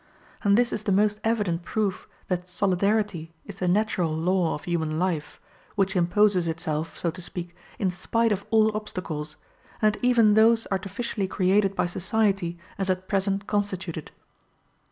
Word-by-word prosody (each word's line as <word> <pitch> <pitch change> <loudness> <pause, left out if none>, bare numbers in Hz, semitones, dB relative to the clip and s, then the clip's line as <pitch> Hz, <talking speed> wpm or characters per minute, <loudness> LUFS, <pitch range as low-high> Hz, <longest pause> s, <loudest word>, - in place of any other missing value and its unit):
And 200 -1 +4
this 245 0 +2
is - - -2
the 215 - -1
most 210 +2 +2
evident 210 -7 0
proof 195 +1 -2 0.2
that 180 -1 -2
solidarity 190 -3 0
is 200 -1 -10
the 180 - 0
natural 185 -3 +1
law 170 +2 +1
of 150 - -9
human 160 -3 -1
life, 170 -4 -2 0.4
which 195 -1 +1
imposes 180 0 +3
itself, 160 -1 -3
so 170 - -1
to 180 - -9
speak, 175 0 -6 0.2
in 190 -2 0
spite 230 +5 0
of 200 -1 0
all 220 -1 +4
obstacles, 170 -8 -5 0.4
and 215 -1 +2
even 235 -4 +5
those 225 +1 +5
artificially 195 +1 -2
created 195 +1 +2
by - - +1
society 190 -1 0 0.2
as 195 -1 -1
at 185 0 -1
present 195 0 0
constituted. 190 -6 -2
190 Hz, 155 wpm, -26 LUFS, 175-210 Hz, 0.4 s, even